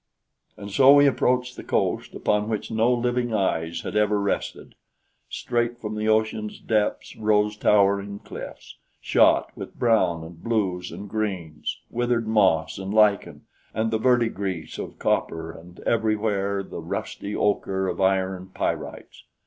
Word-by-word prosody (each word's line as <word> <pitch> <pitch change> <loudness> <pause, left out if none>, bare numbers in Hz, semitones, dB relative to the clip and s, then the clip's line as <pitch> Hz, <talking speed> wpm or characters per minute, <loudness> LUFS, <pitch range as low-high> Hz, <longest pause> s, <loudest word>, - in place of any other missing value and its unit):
And 100 0 -8
so 130 +7 +7
we 145 0 +7
approached 125 -2 +1
the - - -8
coast - - -1
upon 105 +1 0
which 110 0 -3
no 110 +2 +2
living 120 -1 0
eyes 85 -4 -1
had - - -6
ever 105 -1 +2
rested. 100 0 -3 0.6
Straight 120 0 -1
from 110 -2 -5
the 105 0 -2
ocean's 110 -1 0
depths 105 -2 -1
rose 105 -1 +2
towering 100 -1 +2
cliffs, - - -10 0.2
shot - - +3
with - - -9
brown 95 -9 +2
and 80 0 -12
blues 95 -6 -1
and 105 - -8
greens 95 -8 -3
withered 120 -1 0
moss 95 -7 +2
and 95 0 -5
lichen 100 -8 +2 0.3
and 110 0 0
the 110 - 0
verdigris 110 -8 0
of - - -7
copper, 80 0 -1
and 85 +2 -14
everywhere 105 -3 0
the - - -8
rusty 100 +1 -5
ocher 95 -2 0
of - - -3
iron 95 -1 +1
pyrites. - - -4
105 Hz, 140 wpm, -24 LUFS, 95-110 Hz, 0.6 s, so